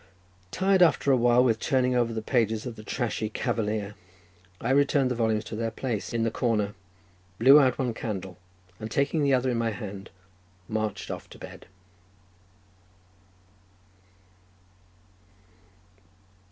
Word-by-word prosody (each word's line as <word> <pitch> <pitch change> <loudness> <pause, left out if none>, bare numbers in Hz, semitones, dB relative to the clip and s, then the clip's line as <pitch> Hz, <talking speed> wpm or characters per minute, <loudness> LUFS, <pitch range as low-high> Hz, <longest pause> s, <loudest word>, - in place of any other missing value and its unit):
Tired 190 - +2
after 160 -5 +4
a - - +6
while 120 0 +4
with 115 -3 +2
turning 125 0 +1
over 120 -2 +1
the 110 -1 -4
pages 110 -3 0
of 120 -2 -6
the 110 - -10
trashy 110 0 -3
"Cavalier," 105 -3 -2 0.7
I 120 - -1
returned 140 -1 +3
the - - -1
volumes 110 -2 0
to 110 - -7
their 115 +1 -2
place 115 -3 -4
in 115 -1 -1
the 115 - 0
corner, 110 -4 0 0.6
blew 135 +7 +8
out 130 -3 +3
one 125 -3 -1
candle, 95 -5 -6 0.4
and 110 - -6
taking 140 +6 0
the 140 -2 +3
other 130 0 0
in 120 - -1
my 115 -1 0
hand 100 -3 -7 0.6
marched 110 -1 -3
off - - -7
to - - -13
bed. - - -11
115 Hz, 140 wpm, -27 LUFS, 110-130 Hz, 0.7 s, blew